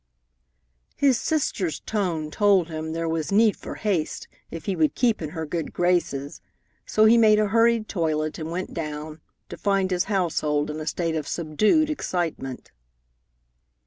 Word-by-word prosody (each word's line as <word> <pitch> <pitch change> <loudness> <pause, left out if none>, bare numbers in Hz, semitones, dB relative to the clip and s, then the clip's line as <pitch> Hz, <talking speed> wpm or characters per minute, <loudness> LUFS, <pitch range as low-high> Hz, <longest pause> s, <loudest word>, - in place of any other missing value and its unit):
His 270 -4 +3
sister's 200 - -1
tone 170 -8 -2
told 195 -3 +3
him 160 0 -4
there 165 0 -2
was 160 0 -2
need 215 +1 +4
for - - -8
haste 190 -8 -2 0.2
if 165 -2 -8
he 195 - -1
would 155 -3 +1
keep 235 -6 +1
in 155 - -3
her 160 0 -5
good 160 0 -4
graces, 170 -6 0 0.5
so 215 - +4
he 230 +2 +6
made 215 -2 +6
a 210 -1 +1
hurried 230 0 +3
toilet 155 -4 -1
and 160 0 -5
went 180 +3 -4
down, 155 -1 -5 0.3
to - - -8
find 195 -2 +1
his 180 +1 +1
household 155 -7 0
in 155 - -6
a 155 - -6
state 165 -1 -1
of 155 -2 -3
subdued 215 - +2
excitement. 165 - -3
170 Hz, 160 wpm, -24 LUFS, 155-210 Hz, 0.5 s, he